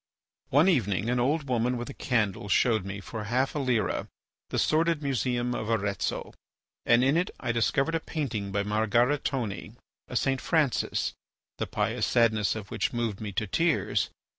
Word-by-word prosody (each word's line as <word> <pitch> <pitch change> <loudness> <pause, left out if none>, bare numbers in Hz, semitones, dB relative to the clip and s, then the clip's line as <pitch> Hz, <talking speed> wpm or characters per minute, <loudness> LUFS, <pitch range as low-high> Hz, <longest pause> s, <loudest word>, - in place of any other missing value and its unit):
One 145 +7 +5
evening 110 - +1
an 125 - +1
old 140 +4 +1
woman 125 0 +1
with 120 - -5
a - - -9
candle 105 -7 -1
showed 110 -1 +3
me, 100 0 -5
for 110 +1 -6
half 125 +5 0
a 150 - -2
lira, 125 -5 0 0.4
the - - -2
sordid 160 0 +2
museum 125 -2 0
of 110 -2 -3
Arezzo, 100 -5 -1 0.5
and 120 +1 +5
in 135 +4 +3
it 180 - +1
I 120 - -1
discovered 135 +7 +1
a 165 - +1
painting 115 -12 -3
by 100 +1 0
Margaritone, 110 +1 0 0.3
a - - -7
"St. 135 +2 +1
Francis," 150 -7 +1 0.5
the - - -1
pious - - -1
sadness 110 -3 +2
of 105 -3 -7
which - - -1
moved 115 -4 -2
me 105 -2 -4
to 110 - -1
tears. 165 - +1
120 Hz, 165 wpm, -28 LUFS, 110-135 Hz, 0.5 s, One